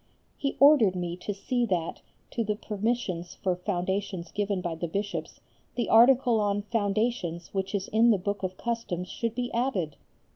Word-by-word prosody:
He 275 Hz, -, -2 dB
ordered 275 Hz, -10 st, +7 dB
me 175 Hz, -1 st, -3 dB
to 195 Hz, -, -4 dB
see 245 Hz, +5 st, -1 dB
that, 175 Hz, -5 st, -2 dB, 0.3 s
to 230 Hz, -, -1 dB
the 210 Hz, -1 st, -1 dB
permissions 205 Hz, -5 st, -2 dB
for 185 Hz, -2 st, -1 dB
foundations 185 Hz, -1 st, -2 dB
given 200 Hz, -2 st, -1 dB
by 175 Hz, -2 st, -3 dB
the 165 Hz, +1 st, -3 dB
Bishops, 200 Hz, +4 st, -4 dB, 0.3 s
the 240 Hz, -, -1 dB
article 240 Hz, 0 st, +6 dB
on 205 Hz, -1 st, 0 dB
"Foundations" 205 Hz, -5 st, -1 dB
which 195 Hz, +1 st, -2 dB
is 195 Hz, -1 st, -2 dB
in 225 Hz, +2 st, +4 dB
the 215 Hz, -, +5 dB
Book 200 Hz, +1 st, -3 dB
of 185 Hz, -1 st, -3 dB
Customs 230 Hz, -7 st, -3 dB
should 230 Hz, -2 st, -3 dB
be 245 Hz, 0 st, -3 dB
added. 230 Hz, -, -1 dB
205 Hz, 170 wpm, -28 LUFS, 180-230 Hz, 0.3 s, ordered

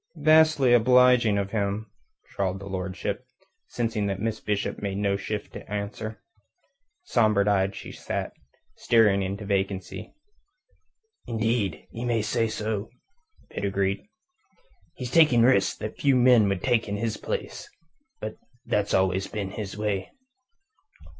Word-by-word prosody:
"Vastly 155 Hz, -5 st, +5 dB
obliging 125 Hz, -2 st, +5 dB
of 100 Hz, 0 st, -2 dB
him," 105 Hz, 0 st, -1 dB, 0.5 s
drawled 95 Hz, -1 st, -1 dB
his 100 Hz, -, -8 dB
lordship, 95 Hz, -1 st, -3 dB, 0.4 s
seeing 115 Hz, -3 st, -2 dB
that 100 Hz, -1 st, -2 dB
Miss 110 Hz, 0 st, -2 dB
Bishop 105 Hz, -1 st, -2 dB
made 100 Hz, -1 st, -3 dB
no 100 Hz, -1 st, +1 dB
shift 105 Hz, +1 st, -5 dB
to -, -, -10 dB
answer. 105 Hz, +1 st, -5 dB, 0.8 s
Sombre 110 Hz, -, +2 dB
eyed 100 Hz, -1 st, +2 dB
she -, -, -8 dB
sat, -, -, -4 dB, 0.4 s
staring 105 Hz, -4 st, +3 dB
into 100 Hz, +2 st, -4 dB
vacancy. 95 Hz, -2 st, -3 dB, 1.1 s
"Indeed, 110 Hz, -5 st, -1 dB
ye 115 Hz, -, -6 dB
may 115 Hz, -3 st, 0 dB
say 115 Hz, +1 st, 0 dB
so," 110 Hz, -1 st, -3 dB, 0.6 s
Pitt -, -, -5 dB
agreed. 100 Hz, 0 st, 0 dB, 0.9 s
"He's 125 Hz, -1 st, -6 dB
taking 135 Hz, -7 st, +5 dB
risks 120 Hz, -6 st, +3 dB
that 110 Hz, -, -6 dB
few 135 Hz, -3 st, +3 dB
would 110 Hz, -7 st, +4 dB
take 120 Hz, -4 st, +1 dB
in 100 Hz, -, -2 dB
his 110 Hz, 0 st, -2 dB
place. -, -, -5 dB, 0.5 s
But 110 Hz, -, -6 dB, 0.3 s
that's 105 Hz, 0 st, 0 dB
always 95 Hz, 0 st, +1 dB
been 100 Hz, -3 st, -4 dB
his 100 Hz, -1 st, -6 dB
way." 105 Hz, -2 st, -2 dB
105 Hz, 130 wpm, -26 LUFS, 100-115 Hz, 1.1 s, Vastly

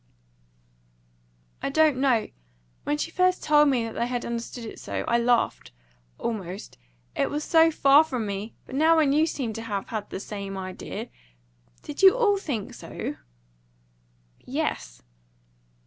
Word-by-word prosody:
"I -, -, -1 dB
don't 310 Hz, -1 st, +3 dB
know. 255 Hz, -4 st, +2 dB, 0.6 s
When 295 Hz, -, 0 dB
she 330 Hz, -, -3 dB
first 365 Hz, +1 st, +2 dB
told 295 Hz, -1 st, +5 dB
me 250 Hz, -4 st, +1 dB
that 225 Hz, -1 st, -5 dB
they 235 Hz, -, -1 dB
had 245 Hz, -1 st, -3 dB
understood 235 Hz, 0 st, -5 dB
it 220 Hz, -, -8 dB
so, -, -, -4 dB
I 235 Hz, 0 st, +3 dB
laughed 235 Hz, -, +1 dB, 0.5 s
almost 195 Hz, -, -5 dB, 0.4 s
it -, -, +1 dB
was 295 Hz, +1 st, -3 dB
so 325 Hz, +1 st, +5 dB
far 285 Hz, -1 st, +6 dB
from 255 Hz, -8 st, -3 dB
me. 200 Hz, +2 st, -5 dB
But -, -, -12 dB
now 320 Hz, +4 st, +4 dB
when 300 Hz, -3 st, +4 dB
you 310 Hz, +2 st, +3 dB
seem 255 Hz, -8 st, -3 dB
to 225 Hz, -, -6 dB
have 205 Hz, -4 st, -4 dB
had 215 Hz, -2 st, -4 dB
the -, -, -5 dB
same 200 Hz, -1 st, -6 dB
idea 190 Hz, +4 st, -6 dB, 0.7 s
Did 295 Hz, -, -6 dB
you 390 Hz, +4 st, +7 dB
all 415 Hz, -5 st, +3 dB
think 255 Hz, -, -4 dB
so?" -, -, -6 dB, 1.2 s
"Yes." -, -, -4 dB
245 Hz, 150 wpm, -26 LUFS, 215-300 Hz, 1.2 s, you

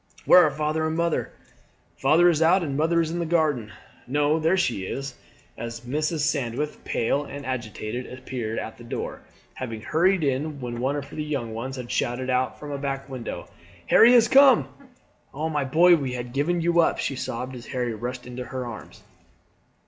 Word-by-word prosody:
"Where 180 Hz, -, +8 dB
are 155 Hz, -, +4 dB
father 155 Hz, +2 st, -1 dB
and 160 Hz, +1 st, -2 dB
mother?" 170 Hz, -1 st, 0 dB, 0.7 s
"Father 160 Hz, +6 st, +5 dB
is 165 Hz, -3 st, +3 dB
out, 175 Hz, +3 st, +4 dB
and 140 Hz, -4 st, -3 dB
mother 165 Hz, +3 st, +2 dB
is 160 Hz, -1 st, -2 dB
in 175 Hz, -, -3 dB
the 170 Hz, -, -1 dB
garden. 150 Hz, -10 st, +1 dB, 0.4 s
No, 145 Hz, +4 st, +2 dB
there 165 Hz, +4 st, +2 dB
she 120 Hz, -, 0 dB
is" 135 Hz, +7 st, -5 dB, 0.4 s
as 115 Hz, 0 st, -6 dB
Mrs. 155 Hz, +5 st, -1 dB
Sandwith, 145 Hz, 0 st, -2 dB
pale 140 Hz, +5 st, 0 dB
and 140 Hz, 0 st, -8 dB
agitated, 120 Hz, -1 st, -4 dB
appeared 125 Hz, -3 st, -5 dB
at 110 Hz, -, -6 dB
the -, -, -11 dB
door, 120 Hz, -, -5 dB, 0.3 s
having 115 Hz, -4 st, -6 dB
hurried 170 Hz, -, +2 dB
in 140 Hz, +2 st, -1 dB
when 120 Hz, -2 st, -5 dB
one 135 Hz, +3 st, 0 dB
of 140 Hz, -1 st, -4 dB
the 155 Hz, -, -4 dB
young 135 Hz, -7 st, -3 dB
ones 130 Hz, +4 st, -5 dB
had 125 Hz, -2 st, -7 dB
shouted 130 Hz, +2 st, -1 dB
out 130 Hz, 0 st, 0 dB
from 150 Hz, -1 st, -7 dB
a 140 Hz, -, -4 dB
back 135 Hz, -1 st, -4 dB
window: 130 Hz, -3 st, -6 dB, 0.4 s
"Harry 235 Hz, -, +7 dB
has 235 Hz, -2 st, +6 dB
come!" 270 Hz, 0 st, +6 dB, 0.7 s
"Oh, 155 Hz, +3 st, -2 dB
my 150 Hz, -3 st, -1 dB
boy, 170 Hz, +6 st, +6 dB
we 135 Hz, -5 st, -3 dB
had 120 Hz, -1 st, -6 dB
given 165 Hz, +5 st, 0 dB
you 170 Hz, +1 st, +2 dB
up," 165 Hz, -, +3 dB
she 135 Hz, -, -2 dB
sobbed 125 Hz, +1 st, -4 dB
as 120 Hz, -, -10 dB
Harry 125 Hz, -2 st, -2 dB
rushed 125 Hz, +3 st, -5 dB
into 125 Hz, 0 st, -6 dB
her 130 Hz, -1 st, -5 dB
arms. 120 Hz, -3 st, -9 dB
140 Hz, 190 wpm, -25 LUFS, 125-160 Hz, 0.7 s, Where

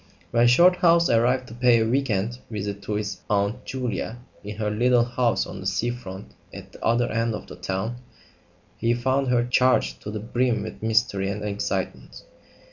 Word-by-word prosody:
When 120 Hz, 0 st, +4 dB
Shorthouse 170 Hz, +5 st, +5 dB
arrived 125 Hz, +3 st, +2 dB
to -, -, -9 dB
pay 120 Hz, -1 st, +4 dB
a 110 Hz, -, +2 dB
"week 135 Hz, +3 st, 0 dB
end" 110 Hz, +4 st, -1 dB
visit 100 Hz, -2 st, -4 dB
to 105 Hz, -, -4 dB
his 105 Hz, -2 st, -3 dB
Aunt 105 Hz, +4 st, 0 dB
Julia 125 Hz, -2 st, -3 dB, 0.3 s
in 105 Hz, +1 st, -6 dB
her 105 Hz, 0 st, -2 dB
little 120 Hz, +2 st, +3 dB
house 120 Hz, -1 st, 0 dB
on -, -, -8 dB
the -, -, -4 dB
sea 120 Hz, +1 st, 0 dB
front 100 Hz, -5 st, -9 dB, 0.2 s
at -, -, -11 dB
the -, -, -13 dB
other 120 Hz, +1 st, +2 dB
end 115 Hz, -1 st, 0 dB
of 105 Hz, -, -8 dB
the -, -, -10 dB
town, 95 Hz, +6 st, -3 dB, 0.8 s
he 115 Hz, +1 st, +1 dB
found 130 Hz, +3 st, 0 dB
her 120 Hz, -1 st, +2 dB
charged 125 Hz, -, +2 dB
to -, -, -7 dB
the 105 Hz, +1 st, -4 dB
brim 120 Hz, 0 st, 0 dB
with 110 Hz, -, -8 dB
mystery 110 Hz, -3 st, +1 dB
and 105 Hz, +1 st, -4 dB
excitement. 100 Hz, -11 st, -4 dB
115 Hz, 185 wpm, -24 LUFS, 105-125 Hz, 0.8 s, Shorthouse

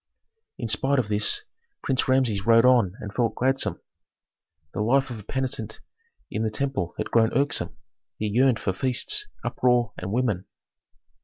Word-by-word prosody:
In 120 Hz, -, -4 dB
spite 135 Hz, +6 st, +2 dB
of 120 Hz, -5 st, 0 dB
this 105 Hz, -, +1 dB, 0.4 s
Prince 130 Hz, -2 st, 0 dB
Rameses 130 Hz, -7 st, +2 dB
rode 115 Hz, +1 st, +6 dB
on 120 Hz, -7 st, +4 dB
and 105 Hz, -1 st, -7 dB
felt 115 Hz, -1 st, 0 dB
gladsome. 135 Hz, +2 st, +1 dB, 0.9 s
The -, -, -2 dB
life 130 Hz, +4 st, +2 dB
of 115 Hz, -, -6 dB
a -, -, -11 dB
penitent 120 Hz, -3 st, -4 dB, 0.5 s
in 110 Hz, -, -2 dB
the 110 Hz, -, 0 dB
temple 130 Hz, -6 st, -3 dB
had -, -, -4 dB
grown 115 Hz, -1 st, +4 dB
irksome; 140 Hz, +3 st, -1 dB, 0.4 s
he 110 Hz, -, -3 dB
yearned 120 Hz, +3 st, +3 dB
for 95 Hz, -, -1 dB
feasts, 135 Hz, -, +1 dB, 0.2 s
uproar, 125 Hz, -3 st, +1 dB
and 95 Hz, +1 st, -5 dB
women. 110 Hz, -6 st, -1 dB
120 Hz, 155 wpm, -25 LUFS, 110-130 Hz, 0.9 s, rode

